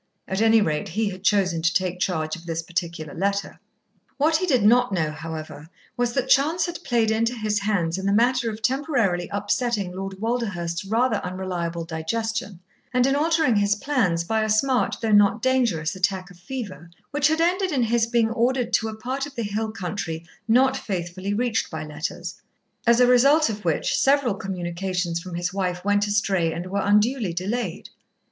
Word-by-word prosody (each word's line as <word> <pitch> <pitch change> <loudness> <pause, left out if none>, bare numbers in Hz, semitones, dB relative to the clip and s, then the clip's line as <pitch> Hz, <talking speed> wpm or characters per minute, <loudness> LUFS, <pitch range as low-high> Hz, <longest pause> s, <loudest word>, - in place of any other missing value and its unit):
At 190 +2 -1
any 225 0 +5
rate, 160 +2 -1
he 210 +4 -1
had 185 0 -10
chosen 190 -5 +2
to 165 +1 +2
take 185 -1 -1
charge 160 -4 -1
of 170 0 -13
this 165 0 -2
particular 170 -2 -4
letter. 200 +3 -2 0.6
What 310 +2 +3
he 370 +2 -2
did 255 - +3
not 245 +2 +5
know, 160 -5 0
however, 155 -1 -7 0.3
was 245 -1 0
that 265 - 0
chance 310 +6 +3
had 345 -1 -6
played 235 -4 +1
into 230 +2 +1
his 215 -2 -1
hands 190 -4 0
in 190 - -3
the - - +2
matter 240 +3 +2
of 215 0 -7
temporarily 240 - 0
upsetting 205 -1 -1
Lord 195 0 -6
Walderhurst's 195 -7 -2
rather 225 +2 +1
unreliable 180 -3 -4
digestion, 200 +4 -3 0.3
and 250 -1 +3
in 270 +1 +2
altering 315 -5 +2
his 205 0 +2
plans, 205 -9 0
by 220 +5 0
a 215 - -1
smart, 250 +4 +2
though 225 - +1
not 205 +1 +5
dangerous, 225 -10 +1
attack 190 0 -1
of 175 - -17
fever 195 - -7 0.2
which 290 0 +3
had 315 +1 +1
ended 365 +3 +1
in 265 -5 +1
his 230 0 +2
being 230 -1 +2
ordered 245 0 0
to 220 - +2
a 215 - -7
part 260 +5 -3
of 280 - -14
the 235 - -2
hill 215 +1 -2
country 180 -5 -5 0.2
not 260 +3 +4
faithfully 190 -3 -3
reached 240 0 0
by 160 -1 -5
letters; 155 +4 -6 0.5
as 235 0 +5
a 250 - +7
result 275 +5 +5
of 210 0 -7
which 165 -3 0
several 270 -4 +3
communications 180 -2 -3
from 175 0 -8
his 175 +1 -2
wife 180 -2 -2
went 205 0 +2
astray 195 -5 +1
and 170 +2 -5
were 195 +2 -2
unduly 210 0 +2
delayed. 205 +8 -3
205 Hz, 185 wpm, -24 LUFS, 180-245 Hz, 0.6 s, a